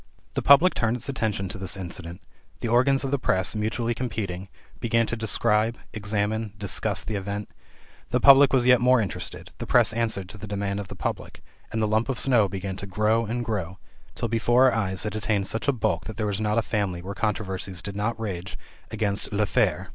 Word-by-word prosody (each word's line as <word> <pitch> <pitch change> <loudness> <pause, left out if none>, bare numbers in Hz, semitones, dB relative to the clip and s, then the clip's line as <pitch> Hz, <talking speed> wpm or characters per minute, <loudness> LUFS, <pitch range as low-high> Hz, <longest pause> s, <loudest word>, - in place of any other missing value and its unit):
The - - -1
public 150 +6 +6
turned 115 +1 0
its 125 +3 -6
attention 110 -7 -1
to 95 - -7
this 95 0 -1
incident, 90 -1 -7 0.4
the - - -3
organs 130 +4 +3
of 135 - -2
the 140 - +1
press, 95 -3 0
mutually 115 +2 -1
competing, 100 -6 -4 0.3
began 115 0 +2
to 120 - -2
describe, 110 0 +1 0.2
examine, 105 0 -2
discuss 100 -1 -1
the 110 - -4
event; 100 +1 -4 0.6
the 125 - +1
public 140 +1 +8
was 130 -2 +3
yet 125 -1 +6
more 125 0 +5
interested; 100 -7 -5
the - - -5
press - - +4
answered 110 -5 -1
to 105 - -9
the 105 - -7
demand 100 0 -2
of 100 - -5
the - - -9
public, - - -5 0.3
and 110 0 -1
the - - +2
lump 110 +4 +1
of 130 -2 -1
snow 115 -7 +3
began 95 0 -4
to 100 - -7
grow 110 +3 +1
and 120 +2 -2
grow, 95 -5 -3 0.4
till 115 - -2
before 120 +3 +4
our - - -3
eyes 95 -4 -1
it 105 -1 -3
attained 105 -2 0
such 110 +7 -3
a - - +5
bulk 100 -10 -1
that 110 - -7
there 110 - -1
was 100 0 -2
not 105 +1 0
a 115 - +3
family 100 -7 -2
where 100 +2 -5
controversies 95 -3 -2
did 100 +2 -7
not 110 +3 -2
rage 95 -4 -5 0.3
about 105 -2 -1
"l'affaire." 105 -1 +1
110 Hz, 210 wpm, -25 LUFS, 100-115 Hz, 0.6 s, public